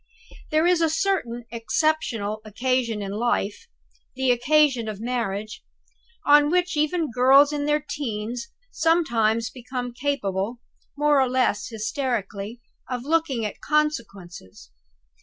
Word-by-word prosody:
There 310 +2 +2
is 350 -1 +3
a 325 - +3
certain 305 -9 -1
exceptional 230 -3 -1
occasion 230 0 -1
in 195 - -5
life 220 - -1 0.5
the 260 -1 +2
occasion 255 -1 +3
of 210 -2 -5
marriage 215 -3 -3 0.6
on 290 0 +6
which 360 +1 +1
even 305 0 0
girls 270 +4 +5
in 290 0 -2
their 300 -1 +1
teens 240 -2 -4 0.2
sometimes 235 -9 +1
become 250 -1 -6
capable 235 -5 -2 0.4
(more 295 -1 +4
or 260 - +2
less 235 -5 +1
hysterically) 220 -1 -3 0.3
of 250 -2 -3
looking 290 -6 0
at 210 - -6
consequences. 200 - -3
245 Hz, 120 wpm, -24 LUFS, 220-295 Hz, 0.6 s, on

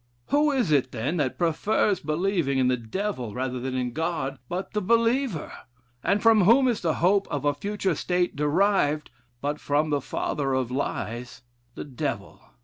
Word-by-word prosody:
Who 295 +1 +3
is 250 - +1
it, 135 -3 +2
then, 135 +10 -2
that 140 -5 -1
prefers 190 +4 +1
believing 155 -2 0
in 130 -1 +3
the 130 - +3
Devil 125 - -4
rather 130 0 -2
than 130 +1 -3
in 125 -2 -2
God, 155 -4 -2
but 180 +2 -4
the 210 - 0
believer? 230 - +1 0.5
And 200 +4 +1
from 220 -4 +6
whom 255 +6 +6
is 235 -4 0
the 165 -3 0
hope 195 +3 +2
of 145 -1 -3
a 145 - +3
future 195 +4 -2
state 180 +3 -1
derived, 150 0 +1 0.3
but 145 +1 -2
from 150 +2 0
the 145 -1 +1
father 135 +1 -2
of 130 -2 -1
lies 120 -3 -4 0.3
the - - -5
Devil? 135 -4 -5
155 Hz, 170 wpm, -26 LUFS, 135-200 Hz, 0.5 s, from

